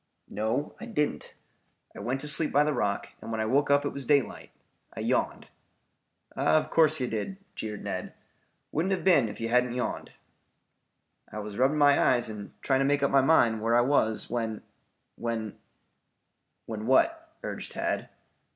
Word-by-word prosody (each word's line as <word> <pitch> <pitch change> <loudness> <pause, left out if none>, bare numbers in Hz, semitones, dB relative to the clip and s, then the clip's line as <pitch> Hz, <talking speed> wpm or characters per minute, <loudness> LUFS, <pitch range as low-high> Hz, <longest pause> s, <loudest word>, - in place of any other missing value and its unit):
"No, 110 +8 -2
I 240 - -8
didn't. 150 -11 -2 0.6
I - - -8
went 130 +3 -2
to 150 - -3
sleep 150 +1 +4
by 145 - +4
the 150 0 0
rock 100 -6 -1
and - - -7
when 110 - -2
I 110 - 0
woke 140 +6 +2
up 140 0 +3
it - - +1
was 140 - -5
daylight. 140 -1 +1 0.5
I - - -5
yawned." - - -1 0.9
"Of 155 - +2
course 155 -2 +4
you 125 - 0
did," 120 - -4 0.2
jeered 105 -2 -6
Ned. - - -5 0.6
"Wouldn't 175 +6 0
have 190 - -2
been 165 -11 +5
you - - -5
if - - -11
you 115 0 -2
hadn't 125 0 +2
yawned." 125 - -4 1.2
"I - - -7
was 105 0 -6
rubbing 135 +4 +3
my 145 -1 +5
eyes 120 -3 +2
and 105 -2 -8
trying 135 -1 +2
to - - +3
make 145 0 +1
up 140 - +2
my 135 - +5
mind 120 -6 +3
where 115 +1 +2
I - - +5
was 120 -4 +1
when 115 -2 -3 0.5
when 115 -3 -4 0.5
" - - -50
"When 110 0 -5
what?" 325 - +2
urged - - -5
Tad. - - -2
130 Hz, 180 wpm, -28 LUFS, 110-145 Hz, 1.2 s, been